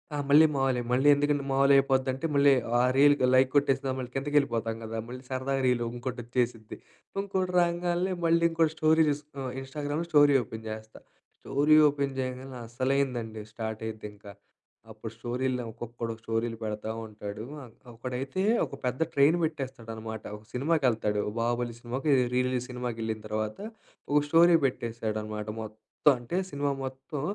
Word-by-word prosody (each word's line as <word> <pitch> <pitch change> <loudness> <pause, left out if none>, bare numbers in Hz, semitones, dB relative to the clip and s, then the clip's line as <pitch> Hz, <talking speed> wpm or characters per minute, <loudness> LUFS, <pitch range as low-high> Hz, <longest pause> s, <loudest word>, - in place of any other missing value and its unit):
ఆ! - - -2
మళ్ళీ 150 +3 +8
మావులే. 135 -3 +1
మళ్ళీ 130 +3 +3
ఎందుకంటే 145 0 +1
మామూలు 135 +1 +4
అయిపోద్దీ 135 -1 +3
అంటే 135 +5 -5
మళ్ళీ 140 0 +6 0.3
ఆ - - +3 0.2
రీల్‌కి 145 -1 +5
లైక్ 130 0 +5
కొట్టేసిన, 135 -1 +2
మళ్ళీ 125 -2 -5
కిందకెళ్ళిపోతాం 135 -5 0
కదా! 110 0 -5
మళ్ళీ 125 +1 -8
సరదాగా 135 +1 -1
రీల్ 125 -1 +2
వుంకోటొచ్చేసిద్ది. 120 -2 -3 0.4
వుంకోటి 190 -2 -1
రాంగాల్నే 175 +2 0
మళ్ళీ 170 0 +3
ఇంకోటి 165 -1 +2
స్టోరీస్, 155 -2 +3 0.4
ఇన్‌స్టాగ్రామ్‌లో 145 +4 -4
స్టోరీ 145 -2 +6
ఓపెన్ 110 0 -9
చేస్తా. 110 0 -8 0.4
స్టోరీ 145 +3 +3
ఓపెన్ 140 -1 -2
చేయంగానే 130 0 -5
అస్సలైందండి, 120 -3 -1
స్టార్ట్ 110 -1 -5
అయిద్దింకా. 105 -2 -8 0.6
అప్పుడు 110 +1 -8
స్టోరీలు 125 +2 -2
ఒక్కొకడు 115 0 -6
స్టోరీలు 115 0 -2
పెడతా 105 0 -3 0.2
ఉంటాడు, 105 0 -7 0.2
ఆన్ 120 -4 -13 0.2
ఒకడైతే 130 +7 -4 0.2
ఒక - - -13
పెద్ద 125 +4 -2
ట్రైన్ 145 +4 +4
పెట్టేస్తాడనమాట. 115 -7 -5
ఒక 105 - -18
సినిమాకెళ్తాడు, 125 -7 +1 0.2
'బాహుబలి' 120 0 -1
సినిమాకో 125 +5 -4
ఏదో 125 -1 +3
రీ 125 - +3
రిలీజ్ 125 -1 -1
సినిమాకెళ్ళిన 115 -3 -4
తర్వాత 110 0 -3 0.5
ఒక 150 0 +4
స్టోరీ 170 +2 +6
పెట్టేసాడనమాట. 110 -4 -3
మొత్తం 110 0 -8 0.4
అంటే 120 +9 -4
సినిమా 140 -3 -1 0.2
మొత్తం 135 +3 -6
130 Hz, 140 wpm, -28 LUFS, 115-145 Hz, 0.6 s, మళ్ళీ